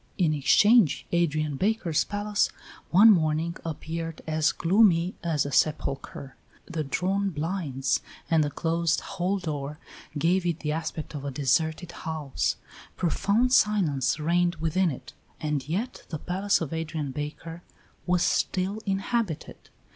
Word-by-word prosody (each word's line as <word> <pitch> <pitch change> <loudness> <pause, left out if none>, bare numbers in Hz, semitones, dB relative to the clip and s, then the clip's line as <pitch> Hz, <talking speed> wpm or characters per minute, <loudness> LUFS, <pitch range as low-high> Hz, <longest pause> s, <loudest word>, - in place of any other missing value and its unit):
In 165 -5 +2
exchange, 205 - +4
Adrian 155 -4 0
Baker's 195 -4 +1
palace 205 0 0 0.4
one 210 +6 +8
morning 165 -2 +1
appeared 165 0 -5
as 155 0 +2
gloomy 180 -1 +3
as 160 -5 0
a 145 - -4
sepulchre; 140 -1 -1 0.3
the 165 -3 -3
drawn 190 +7 0
blinds 150 -5 -1 0.3
and 160 -2 +3
the 145 - -1
closed 165 +2 0
hall 195 +1 -2
door 150 -5 -4 0.4
gave 170 +5 +2
it 170 -2 -2
the 150 - -1
aspect 160 0 -4
of 145 -2 -6
a 140 - -3
deserted 155 +5 0
house; 155 -4 -2 0.4
profound 210 +8 +1
silence 165 - +2
reigned 175 +2 +1
within 165 +3 +1
it, 135 - -8 0.3
and 150 -3 -2
yet 215 +10 -3
the 160 - -3
palace 190 +5 0
of 165 -2 -3
Adrian 160 -3 -3
Baker 155 +4 -6 0.5
was 180 -1 +2
still 190 +3 0
inhabited. 195 -2 -2
165 Hz, 130 wpm, -27 LUFS, 150-185 Hz, 0.5 s, one